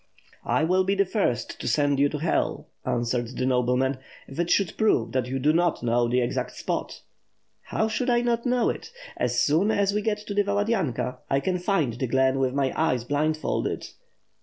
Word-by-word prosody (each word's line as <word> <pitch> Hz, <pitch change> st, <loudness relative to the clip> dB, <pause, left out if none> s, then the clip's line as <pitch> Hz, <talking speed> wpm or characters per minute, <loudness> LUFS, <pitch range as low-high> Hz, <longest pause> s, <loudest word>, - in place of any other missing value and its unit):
"I -, -, +2 dB
will 185 Hz, +3 st, +3 dB
be 195 Hz, +2 st, +1 dB
the 200 Hz, 0 st, +3 dB
first 150 Hz, -, -1 dB
to -, -, -4 dB
send 145 Hz, +3 st, +2 dB
you 145 Hz, +1 st, +4 dB
to 150 Hz, -, -4 dB
Hell," 160 Hz, +3 st, -1 dB, 0.2 s
answered 120 Hz, +1 st, -1 dB
the 125 Hz, -, 0 dB
nobleman, 130 Hz, +1 st, +1 dB, 0.3 s
"if 135 Hz, -, -9 dB
it 175 Hz, 0 st, 0 dB
should 195 Hz, -4 st, +2 dB
prove 220 Hz, -1 st, +2 dB
that 130 Hz, -2 st, -1 dB
you 130 Hz, +1 st, -2 dB
do 145 Hz, +4 st, +2 dB
not 170 Hz, -3 st, +1 dB
know 120 Hz, 0 st, +2 dB
the 125 Hz, +1 st, +2 dB
exact 120 Hz, -, -2 dB
spot." -, -, -4 dB, 0.6 s
"How 220 Hz, -, 0 dB
should 245 Hz, +4 st, -1 dB
I 240 Hz, -1 st, +3 dB
not 235 Hz, -1 st, 0 dB
know 250 Hz, -2 st, +2 dB
it? -, -, -9 dB, 0.3 s
As -, -, 0 dB
soon 165 Hz, +8 st, +3 dB
as 200 Hz, -2 st, +2 dB
we 210 Hz, -, 0 dB
get 210 Hz, 0 st, 0 dB
to 205 Hz, -, -4 dB
the 205 Hz, -, +3 dB
Valadynka, 200 Hz, -, -1 dB
I 135 Hz, -, +2 dB
can 180 Hz, +4 st, -1 dB
find 175 Hz, -, +1 dB
the 125 Hz, +3 st, -3 dB
glen 130 Hz, +2 st, +2 dB
with 130 Hz, 0 st, 0 dB
my 135 Hz, -2 st, +1 dB
eyes 130 Hz, -7 st, +1 dB
blindfolded. 155 Hz, +4 st, -1 dB
150 Hz, 200 wpm, -25 LUFS, 125-200 Hz, 0.6 s, you